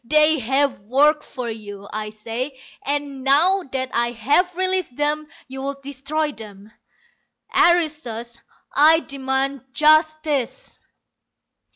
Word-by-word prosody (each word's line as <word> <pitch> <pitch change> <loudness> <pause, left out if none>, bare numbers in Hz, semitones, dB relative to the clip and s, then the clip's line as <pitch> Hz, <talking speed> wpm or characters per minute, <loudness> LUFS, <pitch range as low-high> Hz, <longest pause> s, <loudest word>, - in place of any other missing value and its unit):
They 305 +4 +4
have 270 +2 +1
worked 285 +9 +3
for 250 -2 -6
you, 205 -3 -8
I 215 0 -3
say, 235 +5 -5 0.2
and 280 -1 -3
now 330 +9 +4
that 260 -1 -2
I 235 0 +1
have 290 - +1
released 370 -7 -1
them 300 +1 0 0.2
you 265 0 -7
would 275 0 -5
destroy 285 +3 -2
them. 210 -4 -12 0.8
Aristos, 295 -9 +1 0.3
I 320 +3 +6
demand 270 -1 -2
justice!" 310 - +1
275 Hz, 110 wpm, -22 LUFS, 240-305 Hz, 0.8 s, I